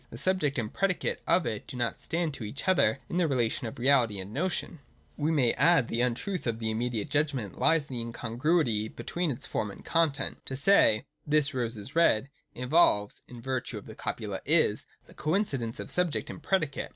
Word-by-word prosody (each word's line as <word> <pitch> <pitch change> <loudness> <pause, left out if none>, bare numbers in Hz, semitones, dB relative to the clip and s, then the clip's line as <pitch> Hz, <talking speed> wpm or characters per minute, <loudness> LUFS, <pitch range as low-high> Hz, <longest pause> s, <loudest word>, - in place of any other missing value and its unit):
The - - -9
subject 150 -2 +1
and 110 -3 -3
predicate 195 -2 0
of 180 - +3
it 105 -7 -4
do 130 - -7
not 120 -1 -2
stand 165 -2 -2
to 125 - -7
each 110 - -5
other 185 -6 +4
in 175 - -3
the 175 -2 +3
relation 120 -4 0
of 110 - -8
reality 120 -4 +3
and 95 +3 -7
notion. 175 +1 -2 0.4
We 150 +1 0
may 135 -7 +3
add 150 -2 +4
that - - -10
the 115 - 0
untruth 125 - -1
of 115 -1 0
the 110 -1 -2
immediate 120 +3 -2
judgment 145 - -1
lies 160 -3 +3
in 135 - -9
the 120 - -2
incongruity 115 0 0
between 175 +8 -3
its 125 - -4
form 105 - -2
and 100 - -11
content. 155 -5 0
To 135 - -3
say 135 - +4
' - - -37
This 145 0 +1
rose 120 -3 -2
is 105 +8 -9
red,' 140 -6 +3 0.2
involves 125 -6 +2
(in 120 -2 -11
virtue 130 0 -3
of - - -9
the - - -9
copula - - -4
' - - -39 0.2
is') - - -3 0.2
the - - -17
coincidence 150 - -1
of - - -5
subject 180 -3 0
and - - -10
predicate. 155 -8 -1
135 Hz, 210 wpm, -29 LUFS, 115-160 Hz, 0.4 s, other